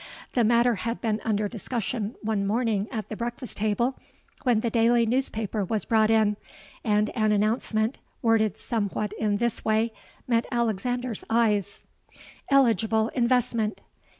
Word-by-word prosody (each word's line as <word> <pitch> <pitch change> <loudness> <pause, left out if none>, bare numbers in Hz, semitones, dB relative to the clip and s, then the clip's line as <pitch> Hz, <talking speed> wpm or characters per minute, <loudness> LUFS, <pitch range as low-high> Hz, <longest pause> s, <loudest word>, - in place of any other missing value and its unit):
The 245 - +3
matter 235 +2 +4
had 230 +3 -2
been 220 -1 -1
under 210 -1 0
discussion 225 0 -3
one 215 -2 0
morning 220 -2 0
at 220 -4 -5
the 215 - -4
breakfast 240 +2 -5
table, 220 +5 0 0.4
when 240 -4 +2
the 235 - -1
daily 235 +1 +4
newspaper 225 -4 -1
was 210 +3 -2
brought 220 -1 +3
in; 215 -2 +3 0.5
and 210 -1 +2
an 215 -2 +1
announcement, 215 +2 0 0.2
worded 225 -2 +2
somewhat 210 -2 -2
in 210 -2 +1
this 235 0 -1
way, 220 +1 +1 0.3
met 235 -2 +1
Alexander's 240 0 -1
eyes:—'ELIGIBLE 225 +1 0
INVESTMENT. 235 -3 +1
225 Hz, 130 wpm, -26 LUFS, 215-235 Hz, 0.5 s, matter